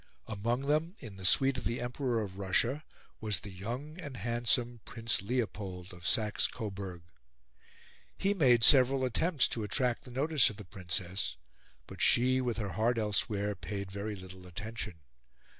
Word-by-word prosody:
Among 115 +4 -1
them, 155 +6 0
in 110 -7 -10
the 95 - -7
suite 135 +8 +4
of - - -11
the 115 +2 -1
Emperor 120 -2 -1
of 95 -1 -8
Russia, 115 +9 +1 0.4
was 105 -5 -1
the 105 - -8
young 125 - -6
and 140 -6 -7
handsome 120 +2 0
Prince 115 -3 -1
Leopold 100 -5 -3
of 90 0 -6
Saxe 105 -2 +2
Coburg. 95 -6 -6 1.1
He 195 +1 +2
made 125 - +4
several 130 0 +7
attempts 140 +4 +2
to 115 - -2
attract 120 +3 0
the - - -10
notice 140 +3 +3
of 105 - -9
the 105 - -9
Princess, 90 -5 -2 0.5
but - - -9
she, 130 +2 +4
with 120 -4 -1
her 105 -3 -2
heart 115 +2 +1
elsewhere, 105 -1 0
paid 100 -1 -5
very 100 +2 -4
little 95 -1 -11
attention. 100 -2 -6
115 Hz, 160 wpm, -32 LUFS, 100-130 Hz, 1.1 s, several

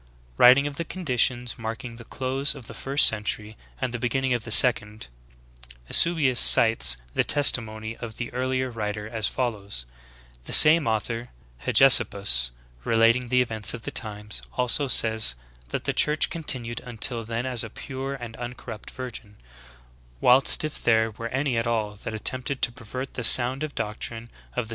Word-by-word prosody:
Writing 125 - +5
of 145 -1 -6
the 170 - -3
conditions 125 -8 -2
marking 115 +1 -8
the 115 - -12
close 135 +4 -2
of 135 -4 -11
the - - -12
first 140 +2 +1
century 105 0 -1 0.2
and 130 -2 -4
the 125 - -5
beginning 125 +2 -2
of 120 -3 -3
the - - -7
second, 110 - +5 0.8
Eusebius 150 -7 +3
cites 70 - +4 0.2
the - - 0
testimony 110 -6 0
of 115 -2 -10
the 120 - -7
earlier 130 0 -3
writer 105 -2 -6
as 110 -1 -3
follows: 100 - -6 0.3
— - - -28
"The - - -5
same 155 -2 +8
author, 115 +2 -4 0.4
[Hegesippus] 100 - +4 0.3
relating 115 - +1
the 125 +1 +1
events 110 -1 0
of 115 - -12
the - - -6
times, 105 -2 -5 0.2
also 125 +3 0
says, 110 - +4 0.3
that - - -5
the - - -3
Church 150 0 0
continued 125 -8 -2
until 120 -1 -3
then 115 +2 -6
as 125 -3 -2
a 110 - -9
pure 135 +3 -8
and 120 -3 -10
un 120 0 -8
corrupt 110 - -11
virgin; 120 -5 -9 0.8
whilst 130 - +3
if 155 -1 -5
there 110 -1 0
were 115 +2 -8
any 135 -1 -3
at 115 +1 -3
all 110 -3 -3
that 110 +2 -8
attempted 130 +4 -4
to - - +2
pervert 130 +3 -9
the 120 - -6
sound 125 +4 +5
doctrine 115 +2 -7 0.2
of 125 - -3
thg. - - -12
120 Hz, 165 wpm, -23 LUFS, 110-130 Hz, 0.8 s, same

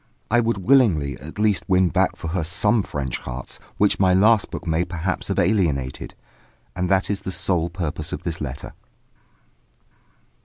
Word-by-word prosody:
I 120 - +4
would 115 -2 0
willingly 95 - +3
at 75 +7 -10
least 105 -2 +2
win 95 -2 +3
back - - +1
for 80 - -6
her 85 0 -1
some 105 +7 +2
French 70 -8 -4
hearts 65 0 -7 0.2
which 105 0 +2
my 95 -1 +4
last 105 +3 +4
book - - -7
may 80 +1 +1
perhaps 90 +1 -3
have - - -2
alienated. 85 -10 0 0.6
And 90 0 -1
that 95 +1 +2
is 100 - -2
the 95 - -4
sole 85 -2 +1
purpose 80 -3 -4
of - - -5
this 85 -2 -4
letter. 70 -2 -6
90 Hz, 165 wpm, -22 LUFS, 80-100 Hz, 0.6 s, I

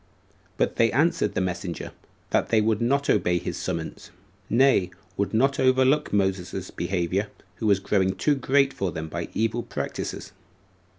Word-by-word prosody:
But - - 0
they 115 -1 +4
answered 140 - +1
the - - +1
messenger, 90 -1 -4 0.4
that - - +1
they 110 - +4
would 110 0 +1
not 140 +4 +1
obey 90 0 +2
his - - -4
summons; - - -5 0.4
nay, 120 -6 +4 0.3
would 100 0 -1
not 135 +5 +2
overlook 130 +3 +3
Moses's 95 -2 -1
behavior, 95 +2 -1 0.3
who 110 - -2
was 100 -2 +4
growing 95 -1 +1
too 150 - +2
great 135 0 +2
for 95 -2 -2
them 80 0 -5
by 85 +1 -4
evil 115 +2 0
practices. - - -5
105 Hz, 155 wpm, -25 LUFS, 95-130 Hz, 0.4 s, they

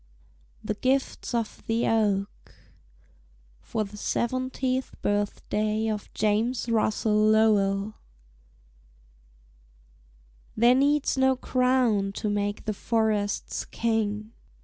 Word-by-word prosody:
THE - - -1
GIFTS 260 +2 -1
OF 230 -2 -3
THE 225 +1 +1
OAK 205 -3 +2 1.3
(FOR 220 - -2
THE 210 0 -10
SEVENTIETH 255 +3 -2
BIRTHDAY 210 +1 -1
OF 210 -1 -4
JAMES 225 +4 0
RUSSELL 215 -1 +1 0.2
LOWELL) 210 -2 +3 2.6
'There 235 +3 +6
needs 280 +1 +2
no 265 0 +4
crown 250 -6 +1
to 210 +1 -2
mark 205 0 -2
the 215 - -1
forest's 215 -1 -1
king.' 215 -2 -1
220 Hz, 90 wpm, -26 LUFS, 205-245 Hz, 2.6 s, There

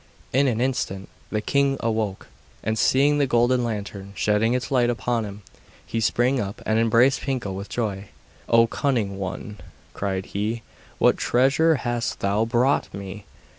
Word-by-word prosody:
In 135 +2 +4
an 115 -3 0
instant 120 -7 -2 0.2
the 110 - -1
king 140 +3 +1
awoke, 110 -4 -2 0.4
and 110 +1 0
seeing 140 +6 +3
the 140 - +2
golden 120 +1 +3
lantern 100 -3 -5
shedding 105 +3 +2
its 125 +3 -3
light 125 -3 +3
upon 120 -1 -1
him, 100 0 -9 0.4
he 115 - -2
sprang 120 +4 +2
up, 100 -3 -4
and 110 +1 +2
embraced 115 +4 +4
Pinkel 125 -8 -2
with 100 +2 -6
joy. 105 -4 -3 0.4
'O 115 0 +6
cunning 115 -6 -1
one,' 95 +2 -5 0.3
cried 95 -1 -2
he, 110 +3 -3 0.3
'what - - +4
treasure 140 +6 +3
hast 120 -3 -2
thou 100 +3 +1
brought 120 +4 +1
me! 100 +1 -8
115 Hz, 155 wpm, -24 LUFS, 105-125 Hz, 0.4 s, O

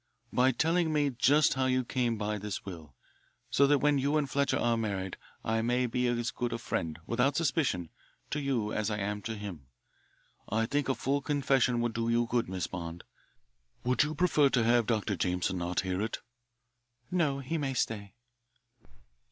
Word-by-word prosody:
"By 130 +1 +4
telling 165 +4 +1
me 145 -2 +2
just 140 +5 +4
how 130 0 +1
you 130 0 +2
came 120 -2 0
by 105 0 -2
this 105 0 -5
will, 80 -8 -9 0.6
so 140 +3 +5
that 145 +1 +5
when 145 0 +3
you 140 +3 +1
and 150 -2 +1
Fletcher 140 +1 +1
are 120 -1 +2
married 100 -4 -2 0.3
I 110 0 +1
may 120 +2 +1
be 125 +1 0
as 120 0 0
good 120 -1 -3
a - - -1
friend, 80 -8 -3
without 125 +6 +1
suspicion, 135 - 0 0.4
to 150 - 0
you 125 -7 -1
as 110 0 0
I 105 - -1
am 105 0 -2
to 110 +2 -4
him. 95 -10 -7 0.8
I 110 +2 +1
think 145 +3 -1
a 135 - +2
full 140 +4 0
confession 135 -4 +2
would 120 -1 -1
do 115 +1 -1
you 120 +1 +3
good, 115 -4 0
Miss 95 -3 -2
Bond. 85 -1 -6 0.8
Would 125 +1 +2
you 155 +1 0
prefer 155 -4 +4
to 125 -3 +2
have 120 -1 +3
Dr. 105 -3 0
Jameson 90 +1 0
not 90 +1 0
hear 95 0 -2
it?" 110 +1 -2 0.9
"No, 160 -6 +1
he 140 +4 -3
may 135 -2 -2
stay." 105 -3 -2
120 Hz, 185 wpm, -30 LUFS, 105-140 Hz, 0.9 s, so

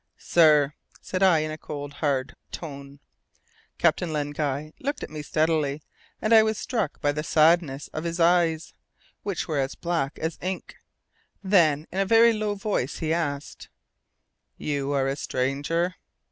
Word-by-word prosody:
"Sir," 150 -4 +4 0.3
said 185 - -4
I 180 -5 +5
in 155 0 -3
a 155 - -7
cold 145 -1 -7
hard 135 -3 -1 0.2
tone. 140 -3 -8 0.8
Captain 175 -3 +2
Len 145 -1 -2
Guy 145 +1 -3
looked 285 +1 -3
at - - -7
me 155 -1 -5
steadily, 155 -1 0 0.4
and 215 - +1
I 220 - +9
was 220 0 0
struck 230 -3 -2
by 145 - +2
the 150 +1 -3
sadness 155 -2 +3
of 155 - -5
his 170 0 -3
eyes, 165 -2 +2 0.5
which 200 -4 -3
were 155 -3 -1
as 135 0 -2
black 165 -5 -2
as 160 0 -4
ink. 185 +1 -5 0.7
Then 165 -7 +3
in 190 - -3
a 195 - +2
very 230 +2 +6
low 210 -1 -1
voice 200 - -2
he 160 0 -1
asked: 145 -4 -3 0.9
"You 140 -1 -2
are 135 -2 +1
a 135 - -1
stranger?" 145 +7 -1
155 Hz, 160 wpm, -25 LUFS, 145-175 Hz, 0.9 s, I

